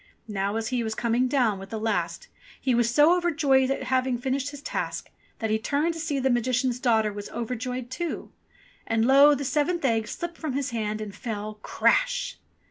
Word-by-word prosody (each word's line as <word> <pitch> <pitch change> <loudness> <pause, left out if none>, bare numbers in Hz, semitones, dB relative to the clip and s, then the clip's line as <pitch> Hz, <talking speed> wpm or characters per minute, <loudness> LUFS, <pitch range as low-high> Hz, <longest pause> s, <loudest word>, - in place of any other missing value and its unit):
Now, 200 -1 -2
as 225 0 -2
he 250 -2 0
was 220 -1 -3
coming 240 +2 +1
down 245 -7 +1
with 195 0 -9
the 220 - -4
last, 220 - -2 0.3
he 260 - +1
was 235 -1 +3
so 295 +8 +5
overjoyed 295 -7 +2
at 270 - -1
having 255 -1 +1
finished 265 +3 -1
his 290 -1 -10
task, - - -4 0.3
that 220 -1 -2
he 220 - +2
turned 295 +8 0
to 330 - -7
see 310 -3 -1
if 265 - -2
the 265 - +3
Magician's 250 +1 +1
daughter 220 -4 +2
was 205 0 -7
overjoyed 250 +1 -4
too: 340 +5 -4 0.6
and 225 0 +2
lo! 280 +3 +7
the 280 0 -4
seventh 300 +4 0
egg 225 -3 +1
slipped 345 -1 -6
from 310 -5 -3
his 275 -1 -2
hand 215 -2 -2
and 210 -2 -6
fell 215 -1 -5
"Crash!" - - +1
255 Hz, 200 wpm, -26 LUFS, 225-285 Hz, 0.6 s, lo